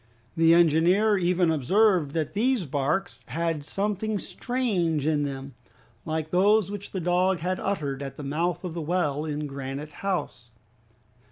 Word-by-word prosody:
The 165 0 +5
engineer 175 +6 +4
even 175 -1 +2
observed 170 - +2
that 160 -2 -2
these 230 -1 +1
barks 150 +7 -2
had 165 -2 -2
something 205 +5 -2
strange 190 - -1
in 150 -2 +1
them, 135 -1 -6 0.5
like 155 0 -3
those 200 +2 +3
which 205 -1 -6
the 190 - -4
dog 180 +1 +1
had 185 +2 -1
uttered 145 -9 -2
at 135 -1 -6
the 150 - -7
mouth 170 +5 -1
of 180 -3 -4
the 170 - -4
well 155 -3 -1
in 150 -1 -3
Granite 140 +1 -6
House. 180 -11 -3
170 Hz, 150 wpm, -26 LUFS, 150-195 Hz, 0.5 s, The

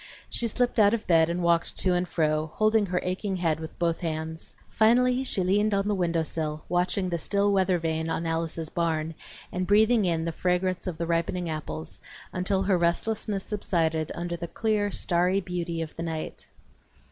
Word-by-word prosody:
She 235 - 0
slipped 245 +1 0
out 210 +1 +6
of 225 - -6
bed 165 -2 +4
and 175 +1 -1
walked 170 -1 +1
to 185 - +2
and 180 0 0
fro, 155 -2 +1
holding 215 -1 +3
her 180 0 0
aching 190 +2 -2
head 165 -4 0
with 160 0 -8
both 170 -1 0
hands. 160 -1 -4
Finally 250 +3 +3
she 195 -7 0
leaned 205 +3 +2
on 195 0 0
the 210 - +2
window 170 -4 +1
sill, 155 -1 -3
watching 180 +2 +1
the 170 -1 -1
still 200 +4 +1
weather 190 -2 +3
vane 160 -1 -2
on 165 - -2
Alice's 165 -1 -2
barn 165 -2 -1 0.4
and 180 0 -2
breathing 215 +2 +4
in 165 -2 0
the 165 - -1
fragrance 180 +2 0
of 175 -3 -3
the 170 - -2
ripening 170 +1 -1
apples, 80 - -5 0.3
until 190 +1 0
her 190 -2 +2
restlessness 195 +3 0
subsided 165 -6 -1
under 175 0 -3
the 170 0 -5
clear 210 +1 0
starry 180 0 +1
beauty 175 -3 -3
of 155 - -9
the - - -6
night. 160 -2 -5
175 Hz, 185 wpm, -27 LUFS, 165-200 Hz, 0.4 s, out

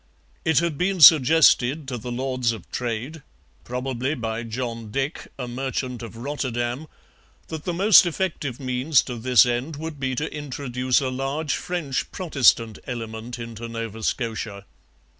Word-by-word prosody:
It 160 -3 +2
had 165 -2 +1
been 190 +1 0
suggested 150 -2 +6
to 125 - -3
the 120 +3 -6
Lords 130 -1 -1
of 110 -6 -10
Trade, 125 +6 -4 0.4
probably 130 +3 -3
by 115 -3 -3
John 115 -1 -5
Dick, 135 +7 -3
a 125 -2 -4
merchant 125 0 -3
of 115 -1 -9
Rotterdam, 125 +1 -3 0.6
that 160 -2 -6
the 175 - -1
most 195 0 +7
effective 160 -7 -3
means 130 +2 +2
to 125 - -6
this 125 0 +5
end 125 +6 -2
would 155 0 -6
be 130 -1 -1
to 155 +5 -3
introduce 130 -3 -1
a 130 - -1
large 135 +4 -2
French 165 -7 -3
Protestant 125 - +2
element 115 0 -5
into 115 -1 -7
Nova 115 -1 -6
Scotia. 110 -3 -3
130 Hz, 145 wpm, -24 LUFS, 120-145 Hz, 0.6 s, most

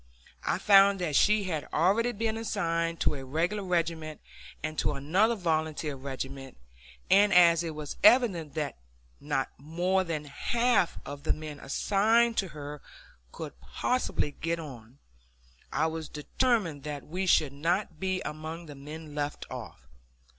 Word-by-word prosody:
I - - 0
found 200 -1 +6
that 165 -5 -1
she 210 +5 +4
had 160 -6 -3
already 205 +9 +2
been 225 0 -1
assigned 170 -7 -1
to - - +2
a 135 -2 -6
regular 170 +10 -1
regiment, 165 -4 -1 0.4
and 155 0 -3
to - - +1
another 190 +12 +2
volunteer 155 -5 -1
regiment, 135 0 -6 0.5
and 205 +1 +6
as 170 -2 +6
it 165 -2 -4
was 150 -1 -6
evident 210 - +5
that 150 - -3 0.4
not 145 -2 -2
more 175 +6 0
than 160 -4 -4
half 235 - +1
of 145 0 -7
the - - +1
men 155 -2 -8
assigned 225 +10 +2
to 195 - +1
her 150 -2 -8 0.5
could - - -8
possibly 250 - -1
get 165 +3 -3
on, 125 -5 -10 0.7
I - - +1
was 160 -1 -3
determined 170 - 0
that 145 -1 -5
we 185 +5 -3
should 150 -5 +4
not 165 +3 -1
be 185 0 -1
among 155 +2 -6
the 150 - -9
men 150 +2 -9
left 145 0 -3
off. - - -8
165 Hz, 145 wpm, -29 LUFS, 150-195 Hz, 0.7 s, found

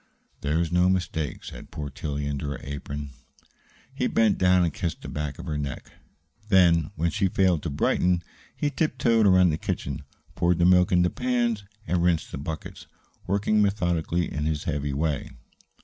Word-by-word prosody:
"There's 80 +3 0
no 90 +1 +4
mistake," 85 -6 -2
said - - -9
poor 75 -2 -6
Tillie 70 +1 -4
into 70 0 -3
her 70 - -4
apron. 70 0 -6 0.8
He - - 0
bent 110 -2 +2
down 90 -1 +4
and 85 -4 0
kissed 85 -3 -4
the - - -6
back 75 -1 -4
of - - -8
her 75 -1 -2
neck. 70 -2 -5 0.6
Then, 85 -5 +5
when 85 +1 0
she 100 -2 +1
failed 90 -3 +2
to 85 - -3
brighten, 90 +4 +1 0.3
he 145 - -1
tiptoed 120 -8 +2
around 95 -2 +5
the 75 - -2
kitchen, 70 +2 -3 0.3
poured 85 0 +2
the 85 - +3
milk 90 0 +5
into 90 -1 +3
pans, 120 -4 0 0.2
and 90 -1 0
rinsed 85 -2 +1
the - - -5
buckets, 80 +2 -7 0.4
working 105 +2 +2
methodically 85 -4 +1
in 75 0 -2
his 75 -1 -1
heavy 75 -2 -2
way. 75 0 -1
85 Hz, 170 wpm, -26 LUFS, 75-95 Hz, 0.8 s, Then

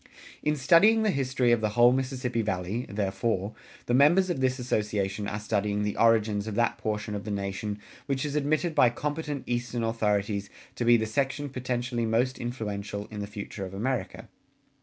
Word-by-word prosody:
[178:1] - - -24 0.3
In 150 0 +1
studying 180 +11 +5
the 215 - +3
history 130 -4 +1
of 120 -2 +3
the 110 - +1
whole 120 +3 +5
Mississippi 130 -2 -1
Valley, 105 +2 -2
therefore, 100 0 -1 0.3
the 120 - -1
members 170 +8 +5
of 160 - -2
this 130 0 +1
Association 105 -4 -1
are 105 0 -3
studying 105 -1 -1
the 105 -1 -1
origins 110 -2 +3
of 110 - -4
that 120 0 +1
portion 105 0 -3
of 100 -1 -4
the 105 - -6
nation 100 +1 -3 0.3
which 135 0 -1
is 145 0 -3
admitted 155 +3 +1
by 135 -5 +5
competent 150 +2 -3
Eastern 120 -1 -2
authorities 105 -3 0 0.2
to 125 -2 -3
be 120 0 +6
the 110 - -1
section 135 +5 -1
potentially 125 -2 -2
most 125 +4 +1
influential 105 -4 -4
in 105 - -6
the 100 - -4
future 100 -1 -7
of 95 0 -7
America. 125 +4 -3
115 Hz, 180 wpm, -28 LUFS, 105-130 Hz, 0.3 s, be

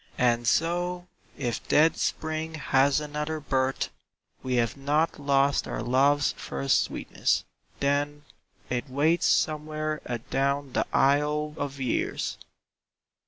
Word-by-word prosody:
And 120 -1 +2
so, 175 +4 +1 0.3
if 120 -4 -3
dead 160 +2 +4
Spring 160 0 -2
has 140 -1 +3
another 150 +1 -3
birth, 135 -2 0 0.5
We 130 -1 -1
have 115 -2 +1
not 145 +4 0
lost 140 -1 +2
our - - -3
love's 140 +4 +3
first 70 0 0
sweetness, - - -1 0.4
then 145 +1 0 0.4
It 125 +2 -3
waits 155 +6 +2
somewhere 155 0 0
adown 135 +3 -1
the - - 0
aisle 150 +2 +2
of 140 -2 -4
years. 130 -3 -2
145 Hz, 115 wpm, -27 LUFS, 130-155 Hz, 0.5 s, dead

